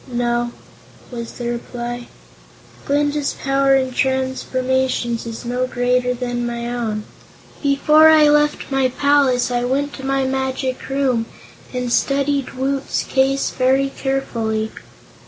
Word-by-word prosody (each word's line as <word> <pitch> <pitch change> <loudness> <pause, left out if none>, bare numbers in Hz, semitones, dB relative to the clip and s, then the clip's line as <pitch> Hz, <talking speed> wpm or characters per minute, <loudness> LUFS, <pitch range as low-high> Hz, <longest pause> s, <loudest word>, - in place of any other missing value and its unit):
"No," 240 0 0 0.6
was 235 -2 -6
the 240 - -5
reply. 240 0 -5 0.8
"Glinda's 290 0 0
power 275 0 +3
in 260 -1 +1
transformations 260 -2 -1
is 230 +1 -7
no 250 +1 -1
greater 250 0 +1
than 245 -1 -3
my 235 0 -3
own. 220 -3 -2 0.6
Before 300 +2 +5
I 310 -1 +6
left 295 -1 +2
my 270 -1 +2
palace 265 -2 +2
I 245 0 0
went 280 +3 -1
to 265 - -9
my 270 0 0
Magic 265 0 -2
Room 260 -4 0 0.4
and 250 -1 -2
studied 280 -1 +1
Woot's 270 +1 -1
case 270 +1 +1
very 265 +1 +2
carefully. 225 -5 -2
260 Hz, 120 wpm, -20 LUFS, 240-275 Hz, 0.8 s, I